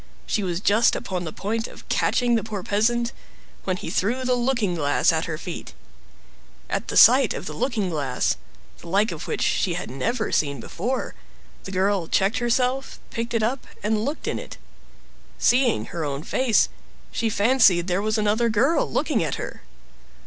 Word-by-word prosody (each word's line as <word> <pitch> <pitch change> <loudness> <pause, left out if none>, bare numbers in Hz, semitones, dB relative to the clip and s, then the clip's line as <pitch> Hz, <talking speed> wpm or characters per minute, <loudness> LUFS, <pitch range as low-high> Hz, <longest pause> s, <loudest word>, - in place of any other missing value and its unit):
She 210 - 0
was 180 -3 -2
just 215 +3 +4
upon 185 -6 -3
the 160 - -4
point 225 +6 -3
of - - -14
catching 245 -1 +1
the 230 - +2
poor 210 -4 -5
peasant, 235 +4 +1 0.5
when 185 -1 0
he 160 - -6
threw 235 +10 0
the 255 0 +1
looking 240 -6 +1
glass 145 -4 +2
at - - 0
her - - -4
feet. - - -7 1.0
At - - -2
the - - -1
sight 255 0 +7
of - - -6
the 155 - -5
looking 205 - -1
glass, 140 -5 0 0.4
the - - -12
like 200 +5 +2
of - - -7
which - - -1
she 180 -4 +1
had 175 - -5
never 220 - -2
seen 140 -3 0
before, 235 - -3 0.5
the 195 - -6
girl 190 -2 +1
checked 195 +7 +1
herself, 250 +2 0
picked 230 +1 -3
it 225 - +1
up, 245 +4 -1 0.2
and 215 0 +1
looked 290 +6 -4
in - - -1
it. - - -9 0.8
Seeing 245 -2 +3
her 170 - -2
own 140 0 -3
face, 250 +3 +2 0.4
she 230 - -1
fancied 205 -5 +4
there 180 +1 0
was 215 +1 0
another 215 +2 +2
girl 250 +10 +2
looking - - +1
at - - -2
her. - - -7
215 Hz, 180 wpm, -24 LUFS, 180-240 Hz, 1.0 s, sight